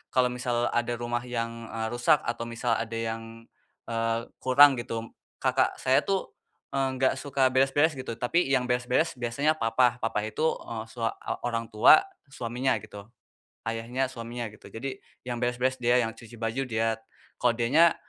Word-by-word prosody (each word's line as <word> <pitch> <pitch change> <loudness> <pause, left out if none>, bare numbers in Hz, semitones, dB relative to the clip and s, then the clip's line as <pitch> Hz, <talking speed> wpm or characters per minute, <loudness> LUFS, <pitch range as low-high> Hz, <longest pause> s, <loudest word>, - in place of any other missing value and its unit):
kalau 125 -1 +4
misal 120 -1 -1
ada 120 0 0
rumah 120 +1 -3
yang, 115 -1 -4
eee, 110 0 -1
rusak, 120 +6 +3
atau 115 0 -3
misal 115 +1 -2
ada 115 0 -4
yang, 115 0 -5 0.4
eee, 115 0 -2
kurang, 135 0 +6
gitu, 115 -1 -5 0.3
kakak - - +2
saya 130 +1 +3
tuh, 195 -1 -2 0.4
enggak 130 -1 +1
suka 140 -2 +2
beres-beres 135 +4 +3
gitu, 130 -4 -6
tapi 135 +6 +1
yang 130 -2 +3
beres-beres 125 +6 +1
biasanya 125 +5 +1
papa, 120 -2 +2
papa 115 -1 0
itu 110 - -5 0.5
sua 115 -1 -2 0.3
orang 115 -1 -2
tua, 110 - +7 0.3
suaminya, 125 0 -1
gitu, 105 -1 -10 0.6
ayahnya, 115 +3 -2
suaminya, 120 0 -5
gitu. 110 - -14
Jadi, 130 +4 -6 0.2
yang 120 -1 -3
beres-beres 125 +2 0
dia, 120 0 +3
yang 115 - -3
cuci 115 +1 -13
baju 115 +4 -2
dia, 110 -1 0 0.4
kalau 120 -1 +3
dianya, 145 +9 +5
120 Hz, 155 wpm, -27 LUFS, 115-130 Hz, 0.6 s, tua